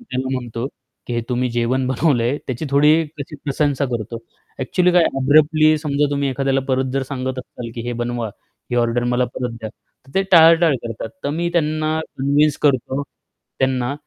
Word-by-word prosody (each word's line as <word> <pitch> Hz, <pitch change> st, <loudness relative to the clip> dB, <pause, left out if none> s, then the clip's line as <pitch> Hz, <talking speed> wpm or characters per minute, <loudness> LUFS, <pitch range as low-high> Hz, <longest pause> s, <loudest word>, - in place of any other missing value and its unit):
त्याला 130 Hz, -, -4 dB
म्हणतो 120 Hz, 0 st, -4 dB, 0.4 s
की, 120 Hz, -, -3 dB
"हे 120 Hz, -, 0 dB
तुम्ही 125 Hz, 0 st, 0 dB
जेवण 120 Hz, +2 st, 0 dB
बनवलंय." 130 Hz, -1 st, +1 dB
त्याची 130 Hz, +4 st, -3 dB
थोडी 150 Hz, +2 st, +5 dB
अशी 150 Hz, -1 st, -8 dB
प्रशंसा 140 Hz, -1 st, 0 dB
करतो. 115 Hz, 0 st, -4 dB, 0.4 s
ॲक्चुअली 180 Hz, +7 st, +1 dB
काय 175 Hz, -1 st, +5 dB
आहे -, -, +2 dB
ना -, -, -1 dB
अब्रप्टली 155 Hz, +2 st, +5 dB
समजा 145 Hz, -1 st, 0 dB
तुम्ही 140 Hz, -1 st, 0 dB
एखाद्याला 135 Hz, +1 st, 0 dB
परत 130 Hz, 0 st, +1 dB
जर 135 Hz, 0 st, 0 dB
सांगत 130 Hz, -1 st, -3 dB
असाल 125 Hz, -2 st, -8 dB
की 115 Hz, -, -5 dB
हे 120 Hz, -, -2 dB
बनवा, 120 Hz, -2 st, -2 dB, 0.4 s
ही 120 Hz, -, 0 dB
ऑर्डर 120 Hz, 0 st, +1 dB
मला 125 Hz, 0 st, +2 dB
परत 125 Hz, -1 st, -3 dB
द्या. 110 Hz, -, -5 dB
तर 135 Hz, +3 st, -27 dB
ते 195 Hz, -, +3 dB
टाळाटाळ 165 Hz, -2 st, +7 dB
करतात. 115 Hz, -1 st, -5 dB, 0.2 s
तर 140 Hz, -, 0 dB
मी 170 Hz, +3 st, -1 dB
त्यांना 155 Hz, -1 st, 0 dB, 0.2 s
कन्विन्स 145 Hz, +2 st, +2 dB
करतो 135 Hz, -1 st, +1 dB, 0.6 s
त्यांना 130 Hz, -1 st, 0 dB
135 Hz, 180 wpm, -20 LUFS, 125-150 Hz, 0.6 s, टाळाटाळ